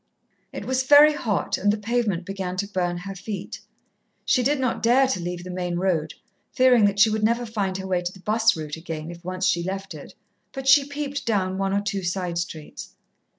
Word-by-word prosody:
It - - -7
was 260 0 0
very 290 +3 +7
hot, 220 -8 -1
and 205 +2 +3
the 210 - -1
pavement 210 -5 -1
began 190 -2 -4
to 200 +2 -1
burn 180 -3 -2
her 195 +3 -6
feet. 195 0 -6 0.7
She 255 - +3
did 280 +3 +1
not 255 -2 -1
dare 250 +4 +4
to 260 -8 -1
leave 175 0 -5
the 180 - -7
main 180 -1 -3
road, 175 -4 -1 0.4
fearing 250 -4 +5
that 200 0 +1
she 215 +1 +6
should 215 0 -1
never 235 +2 +1
find 200 -4 -2
her 190 - -6
way 185 -2 0
to 175 0 -3
the 190 - -15
'bus 220 +1 +2
route 155 -1 -5
again, 160 -1 -6
if 170 0 -12
once 185 +1 -3
she 170 - +2
left 195 +1 -5
it, 150 -2 -11 0.4
but 270 0 -6
she 275 +1 +6
peeped 285 -1 -5
down 190 -4 0
one 195 0 0
or 200 +1 +1
two 200 -1 -3
side 175 -1 -2
streets. 160 -3 -7
195 Hz, 215 wpm, -24 LUFS, 180-235 Hz, 0.7 s, very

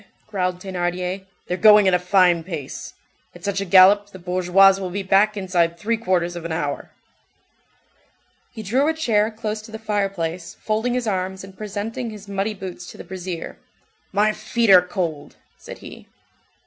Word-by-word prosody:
growled 185 -4 -2
Thénardier. 180 0 -3 0.2
"They're 180 - -3
going 210 -1 +7
at 190 - +3
a 180 - +4
fine 180 -2 +3
pace. 160 -6 -7 0.4
At - - -14
such 200 -1 -1
a - - -2
gallop, 195 +2 +6
the 200 - -12
bourgeoise 185 +2 +4
will 185 -2 -4
be 195 +2 -4
back 200 +3 +3
inside 175 -3 0
three 225 +6 0
quarters 180 -5 -1
of 170 - -6
an 170 - -5
hour." 150 -3 -3 1.6
He 220 - -8
drew 255 +8 +1
a 320 - +1
chair 220 -9 +1
close 215 -1 -5
to 215 - -13
the 220 - -6
fireplace, 195 -6 -3
folding 220 +3 -1
his 250 -1 -1
arms, 190 -2 -2
and 190 0 -12
presenting 215 +3 -5
his 210 -2 -10
muddy 200 +2 -2
boots 185 -2 -8
to - - -12
the - - -9
brazier. 180 -2 -7 0.5
"My 210 +2 +2
feet 220 +1 0
are 185 -1 +9
cold!" 175 -5 -4 0.2
said - - -10
he. - - -11
195 Hz, 175 wpm, -22 LUFS, 180-210 Hz, 1.6 s, are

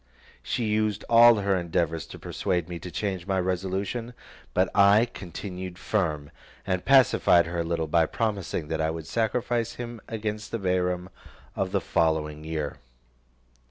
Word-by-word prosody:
She 125 -3 -2
used 105 -1 0
all 120 0 +8
her 100 -2 +1
endeavours 85 -3 -1
to - - -10
persuade 90 -3 -2
me 85 -1 -6
to 90 - -7
change 95 -1 -3
my 95 -1 +1
resolution; 95 +6 -2 0.4
but 95 +1 +3
I 100 +3 +6
continued 90 -3 -7
firm, 80 -9 -1 0.3
and 90 -2 -1
pacified 130 -10 +5
her 85 +1 -4
a - - +1
little, 80 -1 -1
by 80 +1 +2
promising 100 -8 -2
that 80 0 -1
I 80 - +1
would 80 -1 -5
sacrifice 115 +3 -1
him 120 -2 -7
against 105 -1 -4
the 115 - -2
Bairam 90 -2 -1 0.5
of - - -1
the - - +1
following 75 -2 0
year. 80 -2 -3
95 Hz, 155 wpm, -26 LUFS, 85-110 Hz, 0.5 s, all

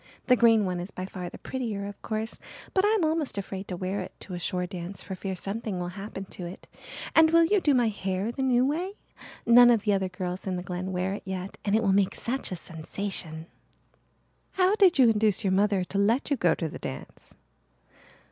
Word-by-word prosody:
The 250 - +5
green 225 -3 +5
one 180 -1 -2
is 175 +2 -5
by 185 - -6
far 180 -2 -6
the - - -10
prettier, 225 -6 -4
of 200 0 -8
course, 220 +1 -4 0.3
but 380 - +3
I'm 415 -4 +3
almost 315 -6 0
afraid 195 0 -5
to 180 - -4
wear 185 +3 -2
it - - -7
to 185 - -8
a 175 - -4
shore 180 +1 -1
dance 180 +1 -7
for 190 - -6
fear 190 0 -4
something 200 +2 -4
will 175 0 -3
happen 195 +1 -7
to 175 - -6
it. 175 - -10 0.5
And 320 0 +7
will 335 +1 +6
you 405 +3 +2
do 290 -5 +3
my 240 -3 +3
hair 195 +1 -2
the 270 - -5
new 255 -1 +3
way? 340 +8 -1 0.5
None 240 +1 +8
of 230 -4 +4
the 210 - +2
other 190 -1 0
girls 180 0 -5
in 185 - -1
the 180 - -4
Glen 180 +1 -4
wear 185 +1 -1
it 200 - -5
yet 190 0 -6
and 205 0 +1
it 225 - +2
will 195 -2 +3
make 195 -1 +2
such 260 -1 -3
a - - -2
sensation." 165 -1 -4 1.1
"How 375 +1 +3
did 385 -6 +5
you 260 -3 +7
induce 215 -2 +3
your 190 -2 +2
mother 200 -1 +2
to 195 +2 -3
let 230 +8 +2
you - - +4
go 175 -9 +2
to 165 - -2
the - - -8
dance?" - - -8
200 Hz, 225 wpm, -27 LUFS, 185-240 Hz, 1.1 s, None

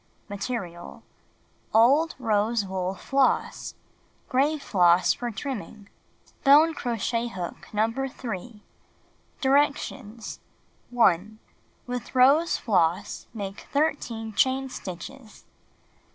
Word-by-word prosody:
Material: 195 -5 -5 0.7
Old 275 +9 +5
rose 220 -2 +1
wool 190 0 -3
floss. 270 +5 0 0.5
Gray 280 +4 +2
floss 180 - +3
for 240 - -4
trimming. 215 -3 -6 0.5
Bone 300 +4 +6
crochet 235 -2 -2
hook 185 -6 -7
No. 215 +1 +2 0.2
3 225 -3 -7 0.8
Directions: 270 -5 0 0.5
1. 215 -3 +2 0.5
With 245 +1 -6
rose 280 +7 +5
floss 185 -1 0
make 200 -2 -6
13 245 -7 -1
chain 265 +5 +1
stitches. 215 +4 -9
230 Hz, 85 wpm, -26 LUFS, 200-265 Hz, 0.8 s, Bone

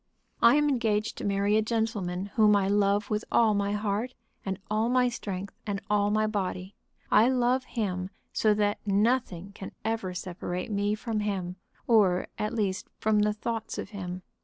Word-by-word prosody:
"I 235 +3 +7
am 295 0 +3
engaged 220 -6 0
to - - -6
marry 200 +1 +1
a - - +4
gentleman 215 -5 -1
whom 215 -2 +5
I 195 -1 +2
love 205 +1 +2
with 210 +1 0
all 225 -2 +4
my 200 0 0
heart, 210 +4 -2 0.3
and 190 -1 -3
all 215 +2 +1
my 250 0 +3
strength, 200 -5 -5
and 200 -1 -1
all 205 0 +3
my 215 +1 +2
body. 190 -2 -3 0.4
I 225 +4 +6
love 255 0 +2
him 185 -5 -3 0.2
so 215 -1 +3
that 205 0 +1
nothing 200 -3 0
can 195 - -8
ever 220 -5 -2
separate 180 +2 -4
me 205 +1 +1
from 220 0 -3
him, 190 -3 -3 0.3
or, 195 -6 +4
at 210 +2 -2
least, 200 -4 -1
from 215 -1 +2
the 210 0 +3
thoughts 225 +1 -4
of 195 - -5
him. 185 -3 -6
210 Hz, 175 wpm, -28 LUFS, 195-225 Hz, 0.4 s, I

